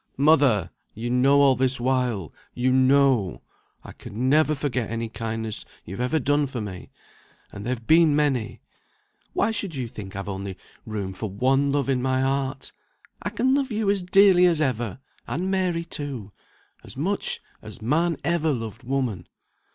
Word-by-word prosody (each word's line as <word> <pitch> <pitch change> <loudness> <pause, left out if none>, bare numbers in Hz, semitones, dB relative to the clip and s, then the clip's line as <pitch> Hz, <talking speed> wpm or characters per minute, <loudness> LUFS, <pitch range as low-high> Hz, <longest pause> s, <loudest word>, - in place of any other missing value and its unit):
"Mother! 135 - +4 0.2
you 120 +3 -3
know 135 +3 +4
all 135 -2 +5
this 130 0 0
while, 125 -8 -1 0.2
you 125 +1 +1
know 130 - +3 0.4
I - - -10
can 120 +5 -4
never 155 +1 +4
forget 130 -5 -2
any 115 0 -3
kindness 110 -1 -4 0.2
you've 95 +6 -7
ever 125 +6 +1
done 145 +1 +1
for 130 -2 -5
me; 95 -4 -7 0.6
and 100 - -8
they've 125 -2 -3
been 160 0 +5
many. 140 -7 0 0.7
Why 225 - +1
should 200 -6 -4
you 130 -3 -3
think 100 -4 -9
I've 100 0 -5
only 95 -1 -5 0.3
room 100 -3 -4
for 105 +3 -4
one 135 +7 +2
love 140 -1 0
in 130 -2 +1
my 130 0 +1
heart? 135 0 -2 0.5
I - - -2
can 260 +1 +1
love 275 -2 0
you 215 -2 +1
as 200 -2 0
dearly 180 0 +5
as 170 -3 +2
ever, 120 -8 -1 0.3
and 185 +5 -2
Mary 180 -3 0
too, 135 - -5 0.5
as - - -12
much 190 +8 -1 0.2
as 110 +2 -10
man 155 +8 +1
ever 160 0 +1
loved 115 -5 -4
woman." 125 -7 -2
130 Hz, 165 wpm, -24 LUFS, 115-150 Hz, 0.7 s, all